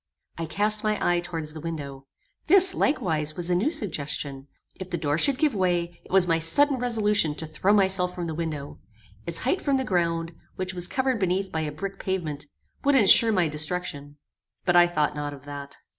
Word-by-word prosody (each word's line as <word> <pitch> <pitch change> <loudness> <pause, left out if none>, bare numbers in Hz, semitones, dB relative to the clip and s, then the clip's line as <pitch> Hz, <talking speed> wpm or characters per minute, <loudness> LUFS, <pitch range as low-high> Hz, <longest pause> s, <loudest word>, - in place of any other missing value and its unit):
I 165 -1 -5
cast 210 +6 0
my 215 -1 0
eye 175 0 +1
towards 165 -3 -4
the 160 - -8
window. 140 -4 -7 0.4
This, 375 +2 +6
likewise, 160 - -1
was 175 0 -2
a - - +3
new 200 +12 +1
suggestion. 145 - -4 0.3
If 185 -1 -7
the 175 - -2
door 150 -1 -1
should 275 +5 +3
give 295 -2 +1
way, 175 -3 -1
it - - -18
was 190 -1 +5
my 165 -1 +2
sudden 270 - +4
resolution 210 -9 +1
to 160 - -5
throw 185 +5 0
myself 190 -3 +2
from 175 - -4
the 160 - -4
window. 155 -3 -5 0.5
Its 170 -1 -1
height 320 +9 0
from 280 -2 +1
the 265 - -1
ground, 170 -5 -1 0.2
which 185 0 -4
was 175 -1 +3
covered 260 0 -1
beneath 190 0 -1
by 160 - -2
a 150 -1 -3
brick 195 +6 -7
pavement, 155 -6 -4 0.4
would 285 0 +3
insure 230 -1 +7
my 180 -5 +2
destruction; 150 -2 -4 0.5
but 175 - +2
I 175 0 +7
thought 150 -4 -1
not 145 -1 -4
of 140 0 -17
that. 140 -1 -9
175 Hz, 200 wpm, -25 LUFS, 155-205 Hz, 0.5 s, insure